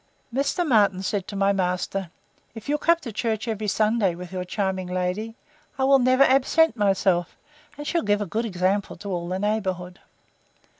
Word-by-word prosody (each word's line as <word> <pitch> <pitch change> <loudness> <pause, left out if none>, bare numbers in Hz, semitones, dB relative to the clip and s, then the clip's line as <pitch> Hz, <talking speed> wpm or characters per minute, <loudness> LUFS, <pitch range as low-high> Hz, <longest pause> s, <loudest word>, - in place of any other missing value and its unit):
Mr. 285 +6 0
Martin 200 -7 +3
said 195 0 -2
to 205 - -7
my 195 0 +2
master, 185 0 -2 0.5
If 225 - -9
you'll 295 +1 0
come 335 +3 +4
to 240 - -6
church 220 +1 -2
every 215 -1 -2
Sunday 210 -3 +1
with 180 +1 -9
your 185 -1 -3
charming 190 -1 -2
lady, 185 +5 -2 0.4
I 265 - 0
will 270 0 +5
never 255 +2 +4
absent 275 +3 +3
myself, 195 -5 +1 0.4
and 295 - -7
she'll 335 +2 0
give 205 0 +1
a - - -1
good 215 +6 -2
example 190 0 -1
to 200 -1 -7
all 175 -1 -3
the 185 - -1
neighbourhood. 190 -3 -2
205 Hz, 180 wpm, -24 LUFS, 185-235 Hz, 0.5 s, will